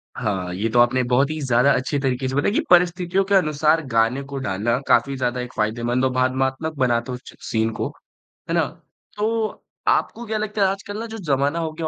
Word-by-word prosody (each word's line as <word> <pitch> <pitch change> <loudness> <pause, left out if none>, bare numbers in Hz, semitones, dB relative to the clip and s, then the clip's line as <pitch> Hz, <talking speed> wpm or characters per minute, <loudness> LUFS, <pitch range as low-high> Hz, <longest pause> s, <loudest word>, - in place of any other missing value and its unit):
हाँ, 95 -6 -2
ये 105 +5 -1
तो 120 - +2
आपने 120 +2 +4
बहुत 125 +3 +2
ही 155 0 -3
ज़्यादा 125 0 +3
अच्छे 130 +3 -1
तरीके 130 -1 -1
से 130 - -3
बताया 145 +8 +1
कि - - +2
परिस्थितियों 180 +1 +3
के 200 +1 +2
अनुसार 155 -2 +3
गाने 115 +3 +2
को 140 - -4
डालना 105 +5 0
काफ़ी 140 0 +3
ज़्यादा 125 -1 -1
एक 125 - -7
फ़ायदेमंद 120 +4 0
और 130 - +1
भावात्मक 130 +4 0
बनाता 125 -1 0
च 125 - -14
सीन 110 0 +1
को, - - 0 0.6
है - - 0
ना? - - +3 0.5
तो 220 +1 -1 0.2
आपको 240 - +1
क्या 220 -1 -2
लगता 215 0 -2
है 195 - +5
आजकल 200 +2 -4
ना 230 - -4
जो 225 0 -7
ज़माना 145 -3 0
हो 160 -1 -2
गया 160 +1 -4
135 Hz, 205 wpm, -22 LUFS, 120-175 Hz, 0.6 s, है